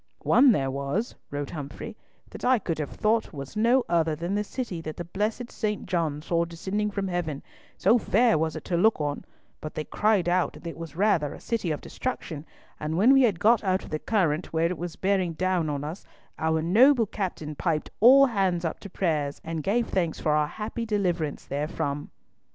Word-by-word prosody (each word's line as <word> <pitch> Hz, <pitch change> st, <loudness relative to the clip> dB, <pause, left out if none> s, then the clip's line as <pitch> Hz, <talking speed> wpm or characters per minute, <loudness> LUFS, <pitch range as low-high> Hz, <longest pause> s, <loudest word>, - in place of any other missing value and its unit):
"One 260 Hz, +1 st, +6 dB
there 135 Hz, -10 st, +1 dB
was," 140 Hz, -, -2 dB, 0.2 s
wrote 145 Hz, -1 st, -4 dB
Humfrey, 145 Hz, -3 st, -7 dB, 0.4 s
"that -, -, -10 dB
I 255 Hz, 0 st, +4 dB
could 170 Hz, -7 st, -3 dB
have 150 Hz, -, -2 dB
thought 220 Hz, -1 st, 0 dB
was 140 Hz, +4 st, -8 dB
no 235 Hz, +4 st, +3 dB
other 165 Hz, -2 st, +1 dB
than 170 Hz, +5 st, -3 dB
the 205 Hz, +1 st, +1 dB
City 210 Hz, -6 st, -5 dB
that 155 Hz, -1 st, -7 dB
the 175 Hz, -, -4 dB
blessed 215 Hz, +7 st, -3 dB
St. 210 Hz, -2 st, -2 dB
John 160 Hz, -5 st, -1 dB
saw 170 Hz, 0 st, +1 dB
descending 190 Hz, +5 st, -2 dB
from 200 Hz, -1 st, -3 dB
Heaven, 175 Hz, -6 st, -3 dB, 0.3 s
so 235 Hz, -, +4 dB
fair 220 Hz, +4 st, +3 dB
was 160 Hz, 0 st, 0 dB
it -, -, -7 dB
to 175 Hz, -, 0 dB
look 220 Hz, +3 st, +3 dB
on, 145 Hz, -1 st, -2 dB, 0.4 s
but 155 Hz, -, -7 dB
they 155 Hz, -, -2 dB
cried 210 Hz, 0 st, +1 dB
out 180 Hz, +1 st, +1 dB
that -, -, -14 dB
it 165 Hz, -, -5 dB
was 165 Hz, -3 st, -8 dB
rather 175 Hz, -6 st, +1 dB
a -, -, -11 dB
City 230 Hz, -7 st, -2 dB
of 150 Hz, -, -2 dB
Destruction, 165 Hz, -, -5 dB, 0.3 s
and 155 Hz, +2 st, -2 dB
when 230 Hz, +8 st, +6 dB
we 270 Hz, -, +6 dB
had 210 Hz, -9 st, +2 dB
got 225 Hz, +3 st, +4 dB
out 190 Hz, -1 st, +1 dB
of -, -, -11 dB
the 155 Hz, -, -1 dB
current 175 Hz, -7 st, 0 dB
where 160 Hz, 0 st, +1 dB
it 180 Hz, -, -4 dB
was 175 Hz, -1 st, -5 dB
bearing 190 Hz, -3 st, 0 dB
down 180 Hz, -2 st, 0 dB
on 145 Hz, -1 st, -3 dB
us, 160 Hz, +6 st, -6 dB, 0.4 s
our 160 Hz, 0 st, +1 dB
noble 235 Hz, -, +5 dB
captain 180 Hz, -7 st, -4 dB
piped 155 Hz, 0 st, -2 dB
all 265 Hz, +5 st, +8 dB
hands 190 Hz, -8 st, 0 dB
up 160 Hz, -, -3 dB
to 200 Hz, -, -9 dB
prayers, 155 Hz, -7 st, -1 dB
and 165 Hz, -1 st, -3 dB
gave 225 Hz, +8 st, +1 dB
thanks 170 Hz, -4 st, -1 dB
for 155 Hz, -, 0 dB
our 150 Hz, 0 st, +2 dB
happy 215 Hz, +7 st, -5 dB
deliverance 180 Hz, -8 st, -1 dB
therefrom." 145 Hz, 0 st, -3 dB
175 Hz, 205 wpm, -26 LUFS, 155-210 Hz, 0.4 s, all